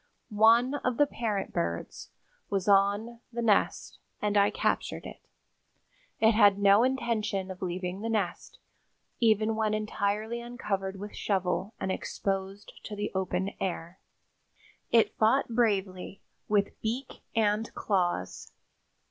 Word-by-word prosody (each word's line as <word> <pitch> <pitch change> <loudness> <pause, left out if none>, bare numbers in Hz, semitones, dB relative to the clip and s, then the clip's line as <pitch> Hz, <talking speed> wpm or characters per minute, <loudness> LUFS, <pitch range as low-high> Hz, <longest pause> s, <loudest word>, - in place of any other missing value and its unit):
One 240 +4 +5
of 250 -2 0
the 290 - +5
parent 220 -7 -3
birds 85 0 -3 0.4
was 195 -1 -1
on 205 +4 +3
the 235 0 -3
nest, 210 -3 +1 0.2
and 210 0 -1
I 200 0 +5
captured - - -1
it. - - -9 1.0
It 220 0 +5
had 205 -3 +5
no 200 +1 +5
intention 225 -7 -1
of 185 - -10
leaving 180 +1 -3
the 225 - -3
nest, 220 -3 -2 0.6
even 220 -1 +3
when 215 -1 +1
entirely 215 +2 -2
uncovered 195 -5 -4
with 205 +1 -7
shovel 190 +1 -1
and 190 - -2
exposed 195 +1 -3
to 210 - -6
the 205 0 -3
open 190 0 -1
air. 175 -1 -4 0.9
It 230 -1 +3
fought 230 +6 +3
bravely 200 -5 -1 0.2
with 205 -1 0
beak 245 +4 -4
and 215 0 +1
claws. 175 - -1
205 Hz, 125 wpm, -29 LUFS, 195-225 Hz, 1.0 s, One